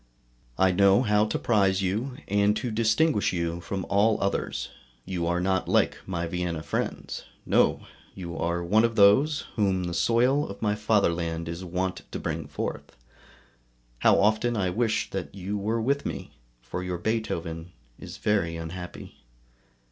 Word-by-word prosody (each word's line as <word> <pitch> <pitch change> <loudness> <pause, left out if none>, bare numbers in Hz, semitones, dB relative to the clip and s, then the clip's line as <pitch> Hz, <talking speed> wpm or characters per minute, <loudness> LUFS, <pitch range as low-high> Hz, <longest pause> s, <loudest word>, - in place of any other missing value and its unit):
I 95 0 +4
know 100 +4 +5
how 105 -2 +3
to 105 - -2
prize 100 -4 +2
you, 115 +8 -2
and 100 +1 +2
to 125 - -3
distinguish 115 +4 +2
you 85 -1 -2
from 95 +1 -4
all 105 +2 +3
others; - - -2 0.4
you 90 -3 -2
are 85 +1 +1
not 95 0 0
like - - +2
my 85 -3 -2
Vienna 85 -2 -3
friends. - - -3 0.2
No! - - +3 0.3
you 85 -3 -6
are 85 +1 -1
one 105 +6 +3
of 115 -1 +1
those 130 +9 +5 0.2
whom 95 -3 +1
the 85 -1 -3
soil 125 +9 +2
of 100 - -8
my 105 -2 +1
fatherland 85 -6 0
is 85 +2 -5
wont 90 +1 -2
to - - -3
bring - - -3
forth; - - -5 1.0
how - - +5
often 110 +3 +2
I 95 -3 0
wish 110 +2 0
that 95 0 -5
you 100 +2 -4
were 110 +3 -1
with 140 +5 0
me, - - -5 0.3
for 90 - -5
your 90 -1 -3
Beethoven 85 -5 -3 0.3
is - - -9
very 100 -6 0
unhappy. 90 +2 -8
100 Hz, 155 wpm, -27 LUFS, 90-110 Hz, 1.0 s, know